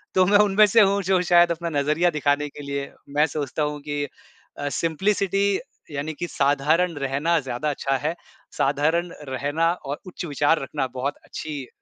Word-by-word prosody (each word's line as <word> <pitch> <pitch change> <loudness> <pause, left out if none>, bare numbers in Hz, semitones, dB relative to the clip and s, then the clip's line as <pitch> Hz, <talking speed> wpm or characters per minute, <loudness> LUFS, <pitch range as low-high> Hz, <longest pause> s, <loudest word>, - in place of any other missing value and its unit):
तो 185 -1 +5
मैं 205 +2 +5
उनमें 210 0 +6
से 220 +3 +5
हूँ 200 0 +3
जो 185 0 +2
शायद 175 -1 +5
अपना 170 0 -2
नज़रिया 155 +5 +2
दिखाने 145 -1 +1
के 145 - -11
लिए 140 0 -4 0.2
मैं 150 +1 +5
सोचता 150 0 -3
हूँ 150 0 -2
कि 145 0 -3 0.5
अ, 145 0 -2
सिम्प्लिसिटी 195 +5 +1 0.3
यानि 145 +2 -3
कि 175 - -2
साधारण 150 +5 +2
रहना 145 +5 +1
ज़्यादा 135 +3 -3
अच्छा 135 -1 -1
है। 160 +3 0 0.4
साधारण 160 +5 +1 0.2
रहना 145 +6 0
और 145 -5 -6
उच्च 180 - -7
विचार 145 +1 +2
रखना, 135 0 -2
बहुत 130 +3 -3
अच्छी 145 -4 -6
150 Hz, 170 wpm, -24 LUFS, 145-175 Hz, 0.5 s, उनमें